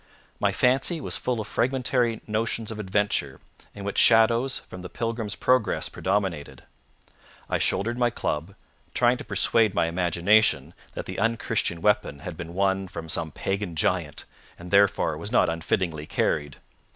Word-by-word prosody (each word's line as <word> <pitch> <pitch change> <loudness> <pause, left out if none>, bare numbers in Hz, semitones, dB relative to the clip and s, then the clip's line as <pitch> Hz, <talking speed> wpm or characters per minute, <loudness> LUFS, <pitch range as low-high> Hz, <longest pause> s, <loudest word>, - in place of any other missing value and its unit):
My - - +2
fancy 135 +7 +2
was - - -2
full 125 -2 -1
of 110 - -3
fragmentary 125 -2 0
notions 110 +1 -2
of 110 - -6
adventure, 95 -9 -1 0.4
in 100 - -8
which 100 0 -1
shadows 115 +3 +4
from 90 - -10
The 90 - -8
Pilgrim's 115 -2 -3
Progress 125 -3 +1
predominated. 90 -9 -2 0.8
I - - 0
shouldered 115 +4 0
my 120 -1 +3
club, 85 -4 -3 0.4
trying 125 0 +3
to - - -7
persuade 105 +1 +2
my - - +3
imagination 85 -1 +2 0.2
that - - -5
the - - -5
unchristian 115 -5 -1
weapon 105 -8 +2
had 90 - -6
been 85 0 -8
won 95 0 +1
from 80 -2 -8
some 80 0 -1
pagan 95 +2 -3
giant, 80 - -1 0.3
and 85 0 -10
therefore 100 -6 +3
was 100 +6 -6
not 120 - +4
unfittingly 80 -1 -2
carried. 75 -2 -1
100 Hz, 150 wpm, -25 LUFS, 85-115 Hz, 0.8 s, shadows